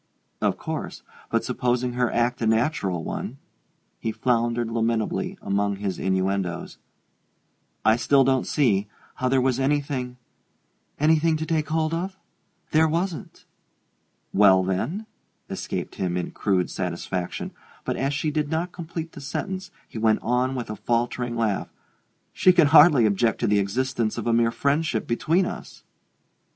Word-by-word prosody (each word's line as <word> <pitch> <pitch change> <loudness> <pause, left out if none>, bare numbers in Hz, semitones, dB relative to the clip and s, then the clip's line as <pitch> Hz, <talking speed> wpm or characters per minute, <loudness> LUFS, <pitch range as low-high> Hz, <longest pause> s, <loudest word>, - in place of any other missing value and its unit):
"Of - - +1
course - - -5 0.3
but - - +1
supposing 125 0 0
her 125 -1 +1
act 120 +1 0
a 115 - +1
natural 110 - +1
one 125 - -5 0.3
" - - -45
he 110 - -2
floundered 115 0 0
lamentably 115 -1 -1
among 100 0 0
his 100 -1 -3
innuendoes 95 -1 -1 1.1
"I 110 +1 +5
still 135 +3 +4
don't 130 0 +1
see 105 -8 +2 0.3
how 130 - 0
there 135 0 +3
was 130 0 +1
anything 135 -3 -1 0.4
" - - -42
"Anything 160 +1 +3
to 160 - -3
take 160 -2 -1
hold 160 0 0
of? 185 +3 -3 0.5
There 160 +1 +4
wasn't 170 +2 -3 0.4
" - - -46
"Well, 95 -2 +6
then 95 - -2 0.2
?" - - -46
escaped - - -4
him, 90 -2 -2
in 90 - -3
crude 95 -3 0
satisfaction; 90 0 -3 0.3
but - - -1
as 135 +1 0
she 150 +2 -1
did 150 -1 -1
not 165 +3 -1
complete 165 -1 -6
the 145 - -10
sentence 185 +6 -4 0.2
he 110 - -7
went 110 -1 +2
on 125 +3 +1
with 120 -4 -4
a - - -4
faltering 120 +2 -1
laugh: 110 -4 -1 0.6
"She 185 - +5
can 170 -3 +5
hardly 150 -5 +7
object 110 +2 +1
to - - +2
the 105 0 +3
existence 115 +3 -1
of 115 - -3
a 120 - +2
mere 115 0 +4
friendship 140 -1 0
between 165 +10 +1
us!" - - -8
125 Hz, 155 wpm, -25 LUFS, 110-150 Hz, 1.1 s, hardly